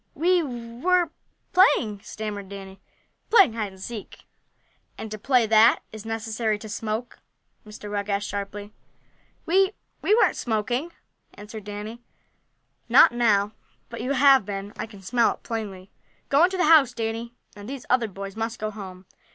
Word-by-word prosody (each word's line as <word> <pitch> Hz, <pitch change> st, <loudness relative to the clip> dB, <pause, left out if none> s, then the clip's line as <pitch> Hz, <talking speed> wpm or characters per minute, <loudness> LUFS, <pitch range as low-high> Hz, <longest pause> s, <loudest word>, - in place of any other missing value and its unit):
"We 355 Hz, +2 st, +3 dB
were 270 Hz, +7 st, -1 dB, 0.4 s
playing!" 220 Hz, -, +4 dB
stammered 205 Hz, -3 st, -6 dB
Danny. 195 Hz, -1 st, -10 dB, 0.5 s
"Playing 395 Hz, -, +6 dB
hide 215 Hz, -3 st, -3 dB
and 190 Hz, -, -16 dB
seek." 215 Hz, +1 st, -8 dB, 0.7 s
"And 220 Hz, -, -7 dB
to 215 Hz, -, -5 dB
play 250 Hz, +1 st, +3 dB
that 220 Hz, +2 st, +5 dB
is 220 Hz, 0 st, -9 dB
it -, -, -8 dB
necessary 220 Hz, -1 st, -1 dB
to 215 Hz, -, -10 dB
smoke?" 220 Hz, +2 st, -4 dB, 0.5 s
Mr. 210 Hz, 0 st, -9 dB
Rugg 205 Hz, 0 st, -3 dB
asked 200 Hz, 0 st, -1 dB
sharply. 205 Hz, +1 st, -6 dB, 0.7 s
"We 385 Hz, +4 st, +3 dB, 0.3 s
we 430 Hz, +3 st, +3 dB
aren't -, -, +3 dB
smoking," 240 Hz, +8 st, -1 dB, 0.4 s
answered 210 Hz, 0 st, -10 dB
Danny. 210 Hz, +3 st, -7 dB, 0.9 s
"Not -, -, +7 dB
now, 210 Hz, -4 st, +2 dB, 0.4 s
but -, -, -7 dB
you 270 Hz, -, -1 dB
have 275 Hz, -2 st, +6 dB
been. 200 Hz, +1 st, -6 dB
I -, -, -5 dB
can 200 Hz, -3 st, -14 dB
smell 235 Hz, +5 st, +2 dB
it -, -, -33 dB
plainly. 200 Hz, -5 st, -6 dB, 0.4 s
Go 285 Hz, +5 st, +5 dB
into 375 Hz, +1 st, -2 dB
the 360 Hz, -, +2 dB
house, 300 Hz, -6 st, +6 dB
Danny, 230 Hz, +1 st, -4 dB, 0.2 s
and 205 Hz, +2 st, -10 dB
these 270 Hz, -2 st, -7 dB
other 245 Hz, -2 st, +2 dB
boys 195 Hz, 0 st, -8 dB
must 225 Hz, +1 st, -3 dB
go 215 Hz, 0 st, -3 dB
home. 190 Hz, -3 st, -10 dB
220 Hz, 160 wpm, -25 LUFS, 205-250 Hz, 0.9 s, Not